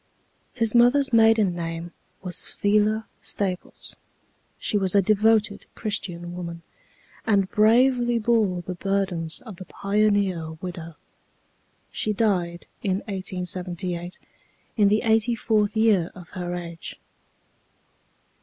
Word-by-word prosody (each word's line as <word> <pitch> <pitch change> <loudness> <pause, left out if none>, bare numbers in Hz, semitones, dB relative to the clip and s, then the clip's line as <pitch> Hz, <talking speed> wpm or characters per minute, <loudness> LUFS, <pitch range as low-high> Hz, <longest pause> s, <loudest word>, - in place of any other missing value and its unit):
His 230 -3 0
mother's 250 +3 +4
maiden 225 -4 +5
name 165 0 -5 0.3
was 180 -2 -1
Phila 215 +2 +2 0.2
Staples. 185 -3 -3 0.6
She - - -1
was 195 -2 +2
a 200 - +6
devoted 215 +1 +2
Christian 175 -5 -3
woman, 170 -1 -6 0.6
and 200 -4 +2
bravely 240 +2 +4
bore 215 -6 +1
the 180 - -5
burdens 180 -3 -1
of 215 -7 -10
the 185 - -9
pioneer 200 -6 0
widow. 165 -1 -7 1.0
She 215 - -1
died 180 -5 0 0.2
in 195 0 0
1878, 180 -2 -4 0.6
in 210 -3 +4
the 210 +3 +2
eighty 225 +1 +2
fourth 215 -1 +1
year 210 -6 +3
of 180 -1 -12
her 180 -2 -4
age. 170 -1 -7
200 Hz, 110 wpm, -24 LUFS, 175-220 Hz, 1.0 s, a